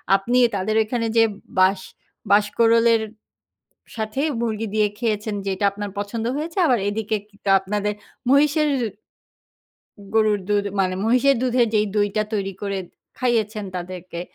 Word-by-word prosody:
আপনি 230 Hz, +6 st, 0 dB, 0.2 s
তাদের 200 Hz, +3 st, -1 dB
এখানে 230 Hz, +1 st, -2 dB
যে 225 Hz, -, +7 dB, 0.4 s
বাঁশ 185 Hz, +1 st, +4 dB, 0.5 s
বাঁশকরলের 230 Hz, +2 st, +4 dB, 1.0 s
সাথে 220 Hz, +3 st, -3 dB, 0.2 s
মুরগি 225 Hz, -1 st, -2 dB
দিয়ে 215 Hz, -1 st, +3 dB
খেয়েছেন 215 Hz, -2 st, -1 dB
যেটা 195 Hz, +1 st, -1 dB
আপনার 205 Hz, 0 st, -5 dB
পছন্দ 205 Hz, +3 st, -3 dB
হয়েছে, 325 Hz, +4 st, -4 dB
আবার 250 Hz, -5 st, +3 dB
এদিকে 215 Hz, +1 st, -1 dB
কিন্তু 200 Hz, -1 st, -9 dB
আপনাদের 205 Hz, +2 st, -2 dB, 0.4 s
মহিষের 300 Hz, +3 st, +4 dB, 1.5 s
গরুর 215 Hz, -2 st, +3 dB
দুধ 205 Hz, -1 st, +1 dB, 0.2 s
মানে, 185 Hz, -1 st, +1 dB
মহিষের 255 Hz, +4 st, +4 dB
দুধের 250 Hz, -1 st, +2 dB
যেই 210 Hz, 0 st, +3 dB
দইটা 205 Hz, +1 st, +1 dB
তৈরি 195 Hz, -2 st, -2 dB
করে 200 Hz, -1 st, -2 dB, 0.4 s
খাইয়েছেন 220 Hz, -4 st, 0 dB
তাদেরকে, 180 Hz, -1 st, -7 dB
215 Hz, 125 wpm, -22 LUFS, 205-235 Hz, 1.5 s, যে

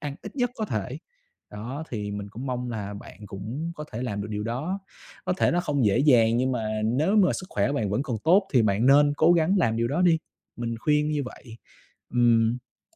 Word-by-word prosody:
ăn 145 Hz, -1 st, -5 dB
ít -, -, -9 dB
nhất 245 Hz, -2 st, +1 dB
có 220 Hz, -, -3 dB
thể. -, -, -3 dB, 0.5 s
Đó, 125 Hz, +9 st, -6 dB
thì 105 Hz, -3 st, -4 dB
mình 100 Hz, 0 st, -5 dB
cũng 120 Hz, +6 st, -7 dB
mong 125 Hz, -1 st, -3 dB
là 105 Hz, -3 st, -5 dB
bạn 105 Hz, +1 st, -11 dB
cũng 115 Hz, -, -5 dB
có 150 Hz, -2 st, -7 dB
thể 115 Hz, -, -4 dB
làm 105 Hz, -5 st, -3 dB
được 105 Hz, -, -6 dB
điều 105 Hz, 0 st, -3 dB
đó. 140 Hz, -, -3 dB, 0.5 s
Có 185 Hz, -, 0 dB
thể -, -, +3 dB
nó 175 Hz, -, +1 dB
không 145 Hz, -7 st, 0 dB
dễ 100 Hz, -, +3 dB
dàng, 120 Hz, -5 st, +5 dB
nhưng 130 Hz, +2 st, +1 dB
mà 120 Hz, -3 st, -1 dB, 0.2 s
nếu 150 Hz, -, +2 dB
mà 195 Hz, -4 st, +5 dB
sức 185 Hz, -, -5 dB
khỏe 105 Hz, +7 st, 0 dB
bạn 110 Hz, -8 st, -1 dB
vẫn 115 Hz, +7 st, 0 dB
còn 125 Hz, -5 st, -3 dB
tốt 190 Hz, +4 st, +4 dB
thì 125 Hz, -5 st, +5 dB
bạn 105 Hz, +3 st, +2 dB
nên 145 Hz, +1 st, +5 dB
cố 160 Hz, +3 st, +5 dB
gắng 170 Hz, +3 st, +3 dB
làm 115 Hz, -10 st, +2 dB
điều 115 Hz, 0 st, 0 dB
đó 150 Hz, +7 st, 0 dB
đi, 170 Hz, -3 st, +4 dB, 0.4 s
mình 115 Hz, -1 st, -3 dB
khuyên 150 Hz, +3 st, +2 dB
như 150 Hz, -1 st, 0 dB
vậy. 115 Hz, -2 st, -11 dB, 0.6 s
Ừm. 120 Hz, -, +1 dB
125 Hz, 225 wpm, -26 LUFS, 110-155 Hz, 0.6 s, dàng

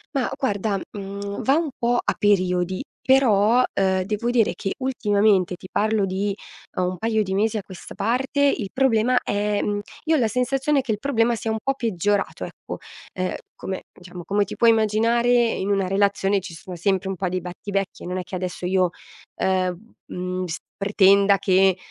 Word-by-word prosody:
Mah, 265 Hz, -, +1 dB
guarda, 205 Hz, -5 st, -1 dB
mhmm, 200 Hz, 0 st, -5 dB
va 270 Hz, -, +3 dB
un 330 Hz, -2 st, 0 dB
po' 240 Hz, +1 st, +1 dB
a -, -, +1 dB
periodi, 185 Hz, -1 st, +1 dB, 0.2 s
però, 245 Hz, -3 st, +4 dB
uhm, 190 Hz, -1 st, +1 dB
devo 210 Hz, +4 st, -2 dB
dire 240 Hz, -3 st, +2 dB
che 195 Hz, -, -3 dB
ultimamente, 205 Hz, -7 st, +2 dB
ti 185 Hz, +1 st, -12 dB
parlo 215 Hz, -1 st, +1 dB
di, 195 Hz, +1 st, -2 dB, 0.4 s
uhm, 180 Hz, -, +1 dB
un 180 Hz, 0 st, -2 dB
paio 220 Hz, -1 st, +1 dB
di 190 Hz, -, -3 dB
mesi 215 Hz, +3 st, +1 dB
a 205 Hz, -, -4 dB
questa 185 Hz, -2 st, -11 dB
parte, 255 Hz, +6 st, -1 dB
il 275 Hz, -8 st, +2 dB
problema 250 Hz, -2 st, +2 dB
è, 205 Hz, 0 st, 0 dB
mhmm 205 Hz, 0 st, -1 dB, 0.2 s
io 320 Hz, 0 st, +2 dB
ho -, -, +2 dB
la 235 Hz, -, +3 dB
sensazione 270 Hz, +4 st, +1 dB
che 245 Hz, -, -3 dB
il 210 Hz, -, -1 dB
problema 240 Hz, -2 st, +1 dB
sia 225 Hz, 0 st, -3 dB
un 220 Hz, -, 0 dB
po' 270 Hz, -, +1 dB
peggiorato 205 Hz, -5 st, -1 dB
ecco, -, -, -8 dB, 0.4 s
ehm, 185 Hz, 0 st, -2 dB, 0.2 s
come 190 Hz, -, -5 dB, 0.2 s
diciamo 175 Hz, -1 st, -10 dB
come 205 Hz, +1 st, +2 dB
ti 200 Hz, -, -7 dB
puoi 235 Hz, -, +5 dB
immaginare, 225 Hz, +2 st, +2 dB
in 230 Hz, -5 st, +2 dB
una 195 Hz, -2 st, +1 dB
relazione 200 Hz, 0 st, +1 dB
ci 180 Hz, -2 st, -9 dB
sono 180 Hz, +2 st, -9 dB
sempre 190 Hz, +2 st, 0 dB
un 190 Hz, -, -2 dB
po' 185 Hz, +2 st, -2 dB
di 185 Hz, +1 st, -2 dB
battibecchi 195 Hz, +2 st, -4 dB
e -, -, -7 dB
non 180 Hz, +1 st, -3 dB
è 180 Hz, -, -4 dB
che 185 Hz, +1 st, -7 dB
adesso 180 Hz, 0 st, -4 dB
io, 185 Hz, -1 st, +2 dB, 0.5 s
ehm, 185 Hz, +3 st, -1 dB
mhmm, 185 Hz, 0 st, -4 dB
s 165 Hz, -1 st, -4 dB, 0.2 s
pretenda 200 Hz, 0 st, +4 dB
che 190 Hz, -1 st, +3 dB
200 Hz, 190 wpm, -23 LUFS, 190-230 Hz, 0.5 s, puoi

